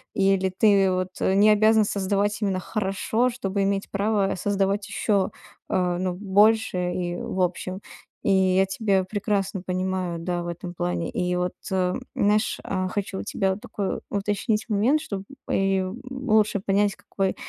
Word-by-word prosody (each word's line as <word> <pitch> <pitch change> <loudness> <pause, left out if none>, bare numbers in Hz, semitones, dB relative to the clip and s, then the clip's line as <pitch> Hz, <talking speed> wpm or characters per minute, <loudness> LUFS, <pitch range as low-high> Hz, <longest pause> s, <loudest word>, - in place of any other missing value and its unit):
Или 195 -1 +2
ты 195 0 +4
вот, 185 0 -1
э, 190 - +2
не 205 +2 +6
обязан 215 +1 +5
создавать 205 +1 0
именно 195 -3 0
хорошо, 215 +5 0
чтобы 200 -5 -2
иметь 195 0 -1
право 200 -1 +1
создавать 200 +1 0
ещё, 200 -2 +1 0.4
а, 180 -1 +1
ну 185 -1 -1
больше. 205 +2 +3 0.2
И 175 -1 -2
в 190 - -4
общем, 185 +2 -2 0.4
и - - +2
я 190 0 +4
тебя 195 0 +1
прекрасно 200 -1 -1
понимаю, 185 -1 -2
да, 175 +1 -2
в - - -6
этом 175 +1 -6
плане. 90 - -2
И 180 0 -1
вот, 180 0 -1 0.2
эм, 185 -1 0
знаешь, 210 +2 +2
а, 185 -1 -2
хочу 200 -1 -3
у - - -4
тебя 190 -2 -1
такой 210 -3 -4
уточнить 205 +2 -1
момент, 230 +9 +2
чтоб 200 -10 -5 0.3
и, 195 0 +2
м, 185 +6 -4
лучше 220 -6 +1
понять, 200 +1 +1
какой 195 -3 -2
195 Hz, 160 wpm, -25 LUFS, 185-205 Hz, 0.4 s, не